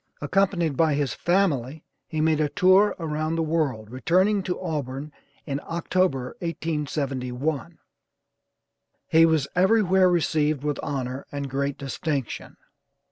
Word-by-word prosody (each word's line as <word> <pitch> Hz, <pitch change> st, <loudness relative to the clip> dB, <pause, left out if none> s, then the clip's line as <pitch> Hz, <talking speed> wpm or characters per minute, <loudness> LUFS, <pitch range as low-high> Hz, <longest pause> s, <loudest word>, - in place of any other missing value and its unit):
Accompanied 170 Hz, -1 st, +1 dB
by 155 Hz, 0 st, +3 dB
his 140 Hz, -5 st, -1 dB
family 160 Hz, -6 st, 0 dB, 0.2 s
he 155 Hz, -2 st, -2 dB
made 155 Hz, -1 st, +2 dB
a 150 Hz, -, +1 dB
tour 185 Hz, +5 st, +4 dB
around 155 Hz, -1 st, -2 dB
the 165 Hz, -, 0 dB
world, 140 Hz, -9 st, -1 dB
returning 185 Hz, +10 st, +2 dB
to 180 Hz, -1 st, -3 dB
Auburn 150 Hz, -4 st, -4 dB, 0.3 s
in 140 Hz, -1 st, -3 dB
October, 165 Hz, -6 st, -1 dB
1871. 150 Hz, -3 st, -3 dB, 1.3 s
He 165 Hz, +1 st, +6 dB
was 155 Hz, -4 st, +1 dB
everywhere 190 Hz, -1 st, +4 dB
received 155 Hz, -4 st, +1 dB
with 145 Hz, -2 st, -1 dB
honor 130 Hz, -1 st, -4 dB
and 140 Hz, -1 st, -4 dB
great 140 Hz, +1 st, -2 dB
distinction. 140 Hz, -1 st, -4 dB
155 Hz, 120 wpm, -25 LUFS, 140-170 Hz, 1.3 s, He